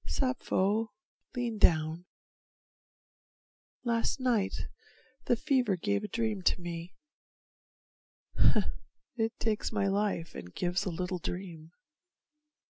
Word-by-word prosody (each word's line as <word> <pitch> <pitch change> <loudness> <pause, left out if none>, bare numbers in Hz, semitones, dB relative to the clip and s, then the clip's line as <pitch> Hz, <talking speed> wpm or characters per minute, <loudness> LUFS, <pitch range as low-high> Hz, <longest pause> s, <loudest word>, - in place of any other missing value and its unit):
Sappho, 225 -4 +1 0.5
lean 235 -3 -1
down. 160 0 +3 1.8
Last 235 +2 +1
night 240 -6 +1 0.7
the 240 - +5
fever 255 -6 +2
gave 205 +3 0
a - - -2
dream 220 -3 -1
to 180 - +3
me, 170 0 -6 2.2
It 225 -2 -1
takes 220 -1 0
my 210 -3 +1
life 195 -4 0
and 90 +1 -9
gives 180 +3 0
a - - 0
little 180 +1 -2
dream. 170 -3 -5
200 Hz, 100 wpm, -31 LUFS, 175-230 Hz, 2.2 s, the